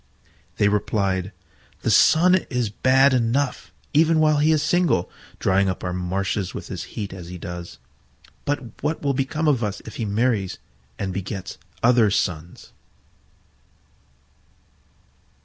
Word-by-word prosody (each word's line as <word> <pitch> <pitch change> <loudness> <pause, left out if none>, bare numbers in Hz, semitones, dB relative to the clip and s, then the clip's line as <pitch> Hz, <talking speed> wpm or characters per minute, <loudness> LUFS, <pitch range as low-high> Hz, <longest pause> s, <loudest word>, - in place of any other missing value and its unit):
They 100 - +3
replied, 100 -2 0 0.5
"The - - +1
Sun 175 +3 +5 0.2
is 125 -5 -1
bad 130 +4 +4
enough 125 +3 0 0.2
even 160 +1 +4
while 155 -1 +4
he 150 +2 +3
is 155 -2 +2
single, 155 - +1 0.3
drying 95 +1 +2
up 90 - -4
our 90 - -2
marshes 95 +1 -2
with - - -7
his - - -5
heat 100 -3 -4
as 90 -3 -9
he 90 +1 -7
does. 85 -5 -8 0.7
But 135 -6 -4
what 150 +2 -2
will 140 -1 +1
become 145 +4 -1
of 130 -5 +2
us 105 -2 -2
if 110 - -9
he 115 - -2
marries 105 -2 0 0.4
and 95 -2 -3
begets 95 0 -5 0.2
other 120 -2 +5
Suns?" 85 -3 -3
110 Hz, 135 wpm, -23 LUFS, 95-140 Hz, 0.7 s, Sun